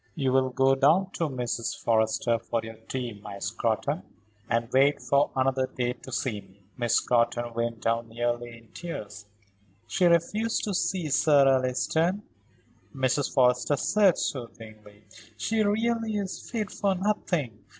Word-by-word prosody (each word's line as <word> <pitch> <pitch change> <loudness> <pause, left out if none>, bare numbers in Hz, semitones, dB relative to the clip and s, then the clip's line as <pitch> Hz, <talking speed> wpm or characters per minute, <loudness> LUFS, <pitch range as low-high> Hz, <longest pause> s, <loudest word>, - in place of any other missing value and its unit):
"You 135 -4 0
will 130 0 +3
go 135 +1 +3
down 160 +8 +3
to 165 -3 -2
Mrs. 120 -3 -3
Forrester 115 +1 +1
for 115 +1 -2
your 110 0 -7
tea, 125 -3 -3
my 100 -1 -8
Scrotton, 115 - -1 0.5
and 115 0 +1
wait 140 +2 +4
for 140 +1 +2
another 130 0 +1
day 125 -1 -2
to 125 +1 -13
see 115 -4 -2
me." 95 0 -23
Miss 120 -2 0
Scrotton 120 0 +1
went 115 -1 -2
down 115 0 0
nearly 120 0 -3
in 115 -1 -20
tears. 110 -11 -8 0.6
"She 150 - +1
refused 190 +7 +2
to 205 - -2
see 175 -2 -1
Sir 145 -1 +5
Alliston," 135 +9 +1 0.7
Mrs. 130 +1 0
Forrester 125 +2 +3
said, 200 0 +3
soothingly. 110 -4 -6 0.3
"She 220 - 0
really 225 +1 0
is 195 -2 -5
fit 220 -4 -3
for 195 -1 0
nothing. 175 - -1
130 Hz, 145 wpm, -27 LUFS, 115-170 Hz, 0.7 s, Sir